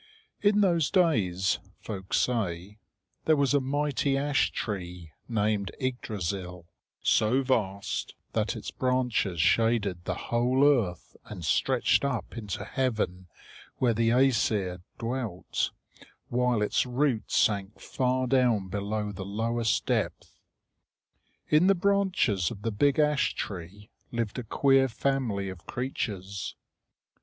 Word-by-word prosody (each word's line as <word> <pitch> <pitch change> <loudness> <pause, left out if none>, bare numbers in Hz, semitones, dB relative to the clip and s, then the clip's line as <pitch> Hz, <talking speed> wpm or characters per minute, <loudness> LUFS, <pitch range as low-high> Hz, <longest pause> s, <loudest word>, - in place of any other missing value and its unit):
In 205 0 +4
those 170 -6 +3
days, 95 - +2 0.2
folk 95 -3 -7
say, 105 -4 -1 0.5
there 160 - +5
was 140 -1 +2
a 145 - +5
mighty 140 0 0
ash 145 0 +2
tree 90 -5 -5 0.2
named 105 -3 0
Yggdrasil, 100 -8 -3 0.4
so 125 +5 +3
vast 100 -6 -1 0.2
that - - 0
its - - -6
branches 125 -8 0
shaded 105 -2 +2
the - - -1 0.2
whole 125 +4 +3
earth 115 - +1
and 90 -6 -7
stretched - - +2
up 140 -5 -2
into 105 -5 -4
heaven 110 -8 -1 0.5
where 120 -2 +2
the 115 +1 +2
Æsir 110 -7 +2 0.2
dwelt, 115 -6 -2 0.6
while 125 -3 +1
its 105 - +2
roots 125 -3 0
sank 100 -1 +1
far 130 0 0
down 120 -7 +2
below 105 +2 -2
the 95 -1 -6
lowest 115 +3 0
depth. - - -2 1.1
In 155 +4 +4
the 195 - +5
branches 185 - +2
of 105 -3 -9
the 115 - 0
big 140 +6 +2
ash 150 -2 +2
tree 100 +2 -7 0.2
lived 115 -1 -2
a - - -4
queer 135 +4 +3
family 115 -5 -1
of 95 -1 -10
creatures. 100 -7 -4
115 Hz, 120 wpm, -28 LUFS, 100-130 Hz, 1.1 s, there